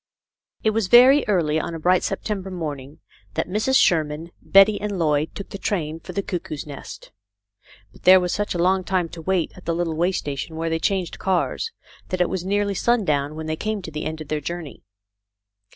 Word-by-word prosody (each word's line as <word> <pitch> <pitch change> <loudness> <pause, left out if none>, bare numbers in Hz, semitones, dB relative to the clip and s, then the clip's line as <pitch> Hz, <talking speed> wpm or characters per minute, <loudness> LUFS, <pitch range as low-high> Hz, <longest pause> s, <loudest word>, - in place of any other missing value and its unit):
IT 220 - +3
was 215 -3 0
very 255 +6 +7
early 160 -6 +2
on 165 - -4
a - - -5
bright 180 +3 +3
September 195 -1 -3
morning 150 -5 -6 0.4
that - - -1
Mrs. 215 +8 +2
Sherman, 160 0 +1
Betty, 200 +2 +5
and 205 -2 -3
Lloyd 150 -2 0
took 200 - -7
the 200 - -7
train 165 -6 -2
for - - -9
the 200 - -2
Cuckoo's 165 -6 -5
Nest; 145 -2 -10 0.8
but - - -19
there 185 +1 +8
was 180 -1 -1
such 205 -2 -2
a - - 0
long 185 +2 +2
time 180 -2 0
to 165 - -9
wait 185 0 0
at 185 - -14
the 165 - 0
little 170 -2 -1
way 175 +4 +2
station 145 -2 -4
where 165 0 -2
they 165 - 0
changed 185 0 -1
cars, 190 - -1 0.4
that 185 - -2
it 180 - +2
was 190 -2 -2
nearly 200 +1 0
sundown 155 -11 +1
when 160 0 -6
they 155 0 -2
came 215 +3 -3
to 160 - -7
the 150 0 -5
end 160 0 -4
of 155 - -9
their 155 -1 -1
journey. 170 0 -6
175 Hz, 205 wpm, -23 LUFS, 160-195 Hz, 0.8 s, there